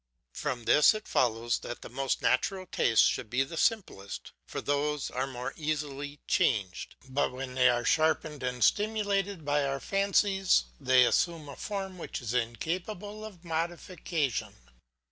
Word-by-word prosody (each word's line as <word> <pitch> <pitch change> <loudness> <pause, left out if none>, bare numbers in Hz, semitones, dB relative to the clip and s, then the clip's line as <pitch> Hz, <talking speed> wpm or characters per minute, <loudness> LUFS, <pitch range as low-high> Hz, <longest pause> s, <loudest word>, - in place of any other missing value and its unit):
From 130 -5 -3
this 150 - +6
it 215 - -6
follows 120 -1 +1
that 120 - -7
the - - -7
most 135 +3 -2
natural 185 +9 +1
tastes 115 -9 +3
should 110 - 0
be 125 +4 +2
the 145 +5 -8
simplest, 160 - -1 0.2
for - - -4
those 145 0 -1
are 130 +1 -1
more 125 0 -5
easily 145 -2 -3
changed; 100 -7 0
but 135 +2 0
when 130 0 -6
they 125 0 +5
are 120 -1 +1
sharpened 155 -2 +1
and 125 -1 -1
stimulated 200 -4 +1
by 145 0 +2
our 135 0 -1
fancies 195 0 +2 0.2
they 130 -2 +5
assume 165 +3 +1
a 140 - -8
form 195 -3 -5
which - - -5
is 120 -2 -4
incapable 180 - -3
of 190 -5 -10
modification. 165 - -2
145 Hz, 150 wpm, -30 LUFS, 125-185 Hz, 0.2 s, this